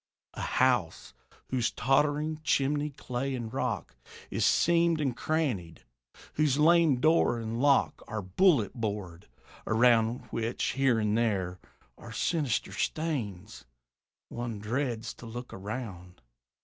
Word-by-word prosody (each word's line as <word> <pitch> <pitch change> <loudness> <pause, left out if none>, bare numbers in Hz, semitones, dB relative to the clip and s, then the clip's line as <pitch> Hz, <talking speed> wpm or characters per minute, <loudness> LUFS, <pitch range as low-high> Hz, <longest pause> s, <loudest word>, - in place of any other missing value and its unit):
A - - -6
house, - - +1 0.4
whose 125 -3 +1
tottering 150 +5 +1
chimney, 145 +1 +1
clay 135 -1 -4
and 115 -2 -6
rock, 135 - -3 0.4
Is - - -1
seamed 170 -1 +3
and 135 -5 -1
crannied; 125 - -2 0.5
whose 145 -3 +2
lame 160 -3 +5
door 155 -5 +3
and 115 +1 -3
lock 140 -1 +3
Are 110 -3 -4
bullet 110 - +3
bored; 100 -7 -5 0.4
around 115 +1 +3
which, 115 +1 -2
there 135 -3 +3
and 105 -1 +1
here, 95 -6 0 0.4
Are - - -10
sinister 145 - -1
stains. 110 - -3 0.6
One 120 -2 -4
dreads 115 +2 -3
to 115 - -12
look 120 +2 -8
around. 95 - -7
120 Hz, 120 wpm, -29 LUFS, 110-145 Hz, 0.6 s, lame